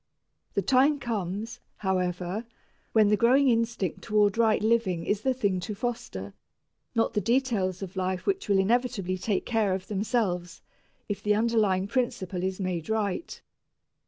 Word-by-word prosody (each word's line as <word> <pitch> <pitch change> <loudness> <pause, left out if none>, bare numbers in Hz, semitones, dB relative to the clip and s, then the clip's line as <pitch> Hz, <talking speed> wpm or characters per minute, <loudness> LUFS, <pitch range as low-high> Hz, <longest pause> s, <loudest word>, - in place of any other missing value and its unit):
The 200 - +1
time 270 - +4
comes, 225 -1 -4 0.2
however, 185 +2 -2 0.4
when 215 -2 +5
the 210 - +5
growing 255 +6 +4
instinct 230 -6 0
toward 210 -1 +2
right 225 -2 +3
living 215 -7 +1
is 205 0 0
the 265 - +1
thing 200 -7 0
to 210 +4 -5
foster 195 - -4 0.6
not 225 0 +2
the 210 - +1
details 225 -7 0
of 190 0 -8
life 185 0 -2
which 390 - -1
will 200 - +4
inevitably 200 -3 +1
take 205 0 -1
care 215 -5 +1
of 190 0 -7
themselves 195 -4 -1 0.4
if 205 -1 -3
the 210 0 +2
underlying 210 -4 +2
principle 200 -7 -2
is 190 +1 -2
made 180 -3 -3
right. 220 - -2
205 Hz, 150 wpm, -27 LUFS, 185-230 Hz, 0.6 s, when